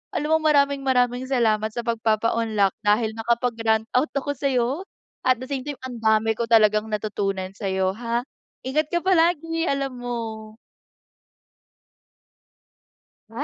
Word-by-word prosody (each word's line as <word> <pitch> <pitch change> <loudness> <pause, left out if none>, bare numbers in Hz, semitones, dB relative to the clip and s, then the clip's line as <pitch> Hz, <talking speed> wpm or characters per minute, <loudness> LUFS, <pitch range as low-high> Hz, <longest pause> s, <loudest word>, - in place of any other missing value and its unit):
alam 300 0 -1
mo, 320 - +6
maraming-maraming 270 -4 +2
salamat 220 -5 +2
sa 240 - -1
pagpapaunlak 225 -2 +1
dahil 215 +1 +3
nakapag-rant 225 -1 0
out 290 +5 +3
ako 280 +1 -1
sa'yo, 255 -3 +1 0.6
at 255 -1 +4
the 260 - -6
same 270 -2 -3
time 290 -3 -6
ang 245 -2 -6
dami 220 0 +3
ko 235 - -1
talagang 215 -1 +4
natutunan 200 -3 -2
sa'yo, 190 -2 -1
ha. 235 0 -1 0.4
Ingat 300 +4 0
ka 345 - +2
palagi 330 -2 +2
alam 275 -2 -2
mo. 225 -3 -5 2.7
Ay 225 - -18
235 Hz, 125 wpm, -23 LUFS, 220-275 Hz, 2.7 s, mo